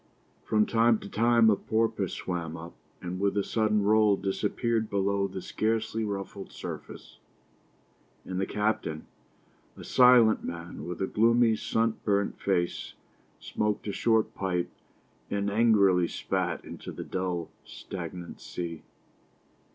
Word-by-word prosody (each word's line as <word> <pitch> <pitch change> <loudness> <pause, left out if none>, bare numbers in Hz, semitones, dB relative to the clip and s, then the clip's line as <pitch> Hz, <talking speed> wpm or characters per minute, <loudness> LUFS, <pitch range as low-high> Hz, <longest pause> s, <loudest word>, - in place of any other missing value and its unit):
From 105 -1 +2
time 115 0 +3
to - - -8
time 115 +1 +4
a - - +4
porpoise 110 -3 -1
swam 85 -3 -4
up, 85 +1 -9 0.3
and 90 +1 -4
with 100 +1 +1
a 100 - +2
sudden 105 -1 +1
roll 105 0 +4
disappeared 110 +3 -1
below 100 0 +1
the 95 -2 -7
scarcely 110 0 -1
ruffled 100 -1 -5
surface. - - -9 1.1
And 95 0 -3
the 95 - -1
captain, 105 -7 -1 0.7
a - - -9
silent 125 -3 +5
man 85 -1 -6
with 90 +2 -3
a - - +2
gloomy, 115 +2 +3
sunburnt 110 -2 0
face, 90 -3 -1 0.4
smoked 105 -1 -2
a - - -1
short 110 0 +2
pipe 90 -2 -2 0.6
and 100 0 -1
angrily 100 -5 +4
spat - - -2
into - - -8
the - - -6
dull, 90 -3 -3
stagnant 90 -2 -8
sea. 85 -2 -6
100 Hz, 130 wpm, -28 LUFS, 95-110 Hz, 1.1 s, silent